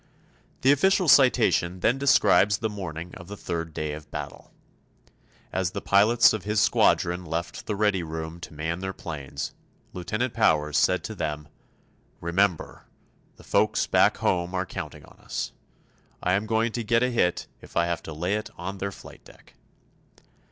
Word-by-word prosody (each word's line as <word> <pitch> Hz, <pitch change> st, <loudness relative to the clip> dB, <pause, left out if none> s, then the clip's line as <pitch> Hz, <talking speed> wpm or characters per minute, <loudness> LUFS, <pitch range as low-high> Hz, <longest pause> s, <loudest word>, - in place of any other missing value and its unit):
The 135 Hz, -, +5 dB
official 185 Hz, +5 st, +3 dB
citation 115 Hz, -, +4 dB
then 125 Hz, +8 st, +2 dB
describes 105 Hz, -6 st, +4 dB
the 110 Hz, 0 st, -2 dB
morning 90 Hz, -4 st, -6 dB
of 85 Hz, -, -11 dB
the 100 Hz, +1 st, -8 dB
third 85 Hz, -3 st, -4 dB
day 75 Hz, -1 st, -3 dB
of 75 Hz, 0 st, -9 dB
battle. -, -, -7 dB, 1.0 s
As 95 Hz, -2 st, -1 dB
the -, -, -3 dB
pilots 110 Hz, +5 st, +5 dB
of 110 Hz, -4 st, -4 dB
his 105 Hz, 0 st, 0 dB
squadron 90 Hz, -4 st, +2 dB
left 85 Hz, 0 st, -5 dB
the 105 Hz, -, -1 dB
ready 105 Hz, -2 st, +1 dB
room 80 Hz, +1 st, -6 dB
to 85 Hz, -, -9 dB
man 80 Hz, +3 st, -3 dB
their 95 Hz, 0 st, -4 dB
planes, 70 Hz, -5 st, -6 dB, 0.4 s
Lieutenant 110 Hz, +7 st, -2 dB
Powers 75 Hz, -9 st, +2 dB
said -, -, +3 dB
to -, -, -5 dB
them, 75 Hz, 0 st, -4 dB, 0.7 s
"Remember, 90 Hz, +1 st, -1 dB, 0.5 s
the -, -, -17 dB
folks -, -, +2 dB
back -, -, +3 dB
home 90 Hz, 0 st, 0 dB
are 95 Hz, 0 st, 0 dB
counting 85 Hz, -5 st, -7 dB
on -, -, -20 dB
us. -, -, -4 dB, 0.7 s
I 90 Hz, -, +2 dB
am 100 Hz, +3 st, 0 dB
going 115 Hz, +1 st, +1 dB
to 120 Hz, +1 st, -3 dB
get 115 Hz, +2 st, +2 dB
a 125 Hz, -, +1 dB
hit 90 Hz, -7 st, +1 dB, 0.2 s
if -, -, -9 dB
I 85 Hz, -, +3 dB
have 85 Hz, 0 st, -2 dB
to -, -, -9 dB
lay 85 Hz, +5 st, -2 dB
it 105 Hz, 0 st, -2 dB
on 95 Hz, +2 st, -6 dB
their 100 Hz, +1 st, -3 dB
flight -, -, -13 dB
deck. -, -, -19 dB
95 Hz, 170 wpm, -26 LUFS, 85-110 Hz, 1.0 s, The